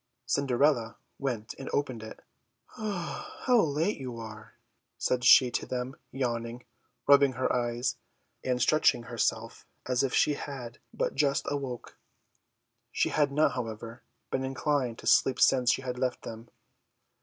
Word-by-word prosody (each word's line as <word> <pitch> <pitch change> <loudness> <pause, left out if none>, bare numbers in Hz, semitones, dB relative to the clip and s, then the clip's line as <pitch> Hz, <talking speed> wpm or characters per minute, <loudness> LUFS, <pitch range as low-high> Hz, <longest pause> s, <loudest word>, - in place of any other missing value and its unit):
Cinderella 125 -2 +1 0.2
went 120 -6 -3
and 135 - -6
opened 130 -5 -1
it 110 0 -10 0.5
"How 215 +4 -1
late 160 +5 0
you 125 -3 -6
are!" 110 -1 -10 0.4
said 125 -1 0
she 125 0 +7
to - - -2
them, 125 +1 -3 0.2
yawning, 120 -2 -3 0.4
rubbing 140 -1 +6
her 130 +1 0
eyes, 120 +1 -1 0.5
and 125 -1 0
stretching 155 -2 +3
herself 115 -1 -2 0.2
as 125 -1 +1
if 135 - 0
she 150 - +4
had 130 -5 -7
but - - -1
just 140 -1 +1
awoke. 135 -4 -5 0.9
She - - +1
had 145 -2 +2
not, 150 +2 +3
however, 115 -1 -6 0.3
been 130 - -1
inclined 130 -2 -1
to - - -12
sleep 130 -1 +4
since 125 -2 +5
she 135 - -1
had 125 -1 -4
left 125 -1 -1
them. 115 +1 -8
125 Hz, 140 wpm, -29 LUFS, 120-140 Hz, 0.9 s, she